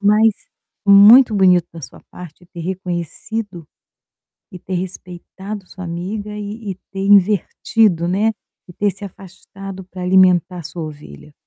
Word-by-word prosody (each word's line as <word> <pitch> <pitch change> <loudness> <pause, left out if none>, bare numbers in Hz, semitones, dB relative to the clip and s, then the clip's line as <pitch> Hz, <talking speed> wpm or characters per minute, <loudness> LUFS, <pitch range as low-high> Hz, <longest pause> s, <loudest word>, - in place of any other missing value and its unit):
Mas 210 +2 +4 0.5
muito 215 +4 +7
bonito 180 -3 +4
da 165 - -10
sua - - -12
parte 175 0 -12
ter 175 - -11
reconhecido 180 +1 -5 0.8
e 180 - -10
ter 185 +2 -7
respeitado 185 +2 -7
sua 185 0 -10
amiga 190 +5 -5
e 205 -1 -6 0.2
e - - -10 0.2
ter 195 - -5
invertido, 200 -1 +2
né, 210 +5 +1 0.4
e 180 - -11
ter 205 +3 0
se 200 +2 -11
afastado 195 0 -11
para 185 0 -10
alimentar 180 -1 +3
sua 170 +1 -7
ovelha. 75 - -11
185 Hz, 135 wpm, -18 LUFS, 175-205 Hz, 0.8 s, muito